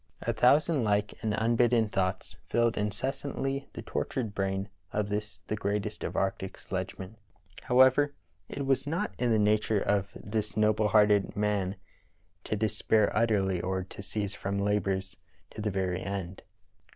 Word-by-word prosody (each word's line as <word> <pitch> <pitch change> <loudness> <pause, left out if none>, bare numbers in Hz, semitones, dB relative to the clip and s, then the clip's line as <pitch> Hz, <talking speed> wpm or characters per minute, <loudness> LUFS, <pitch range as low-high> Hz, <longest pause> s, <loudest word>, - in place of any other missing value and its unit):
A - - 0
thousand 145 +2 +4
like 105 -1 +1
and 110 -1 0
unbidden 115 0 +3
thoughts 95 -2 -2
filled 115 0 +2
incessantly 135 +5 -2
the - - -7
tort - - -2
ured 115 -6 -2
brain 95 0 -1 0.2
of 105 -1 -1
this 105 -4 -4
the 110 - -2
greatest 100 -1 -2
of - - -4
arctic 95 0 -1
sledgemen* 95 +2 -5 0.5
However, 130 +3 +5 0.3
it 140 - -4
was 135 +1 +1
not 165 +4 -1
in 125 - +1
the 110 - +4
nature 105 0 +2
of 100 -1 +1
this 105 0 -3
noble 110 0 +3
hearted 105 -1 +4
man 105 -2 0 0.7
to - - -1
despair 105 0 +1
utterly, 100 -5 +2
or 95 +1 -1
to 95 - -10
cease 100 0 -3
from 100 0 -3
labors 95 -3 0 0.3
to 110 - -7
the 105 - 0
very 95 -2 -1
end. 95 -2 -4
105 Hz, 150 wpm, -29 LUFS, 95-115 Hz, 0.7 s, However